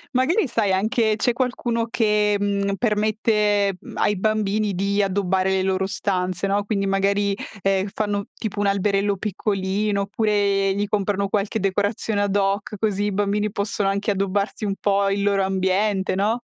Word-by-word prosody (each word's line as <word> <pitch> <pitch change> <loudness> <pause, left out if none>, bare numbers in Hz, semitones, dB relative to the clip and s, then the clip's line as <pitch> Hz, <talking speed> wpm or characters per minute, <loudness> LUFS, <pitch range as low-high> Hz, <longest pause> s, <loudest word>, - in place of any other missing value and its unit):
Magari 290 - +2
sai 220 -5 +1
anche 220 +2 +1
c'è 245 +3 +1
qualcuno 240 -2 -1
che, 210 -2 +1
mhmm, 200 -1 0
permette, 210 -2 +1
mhmm, - - -11
ai 210 - +1
bambini 215 0 0
di 200 +2 +1
addobbare 190 -1 0
le 190 0 +1
loro 190 0 0
stanze, 185 -1 -1
no, 200 +1 +1
quindi 200 -2 -1
magari, 200 +1 +1 0.3
ehm, 195 0 +1
fanno 205 -1 -1
tipo 210 -2 -5
un 205 - +1
alberello 200 0 +1
piccolino, 200 0 -1
oppure 200 -1 +1
gli 205 +1 -1
comprano 200 -1 0
qualche 210 +2 -1
decorazione 205 +2 0
ad 200 -1 0
hoc, 200 +1 0
così 205 -2 0
i 205 - 0
bambini 205 +1 0
possono 200 -1 -1
anche 200 +2 -1
addobbarsi 200 +2 -1
un 200 - 0
po' 200 -1 +2
il 200 0 0
loro 200 -1 +2
ambiente, 190 +1 0
no? 215 +5 0
200 Hz, 160 wpm, -22 LUFS, 195-210 Hz, 0.3 s, Magari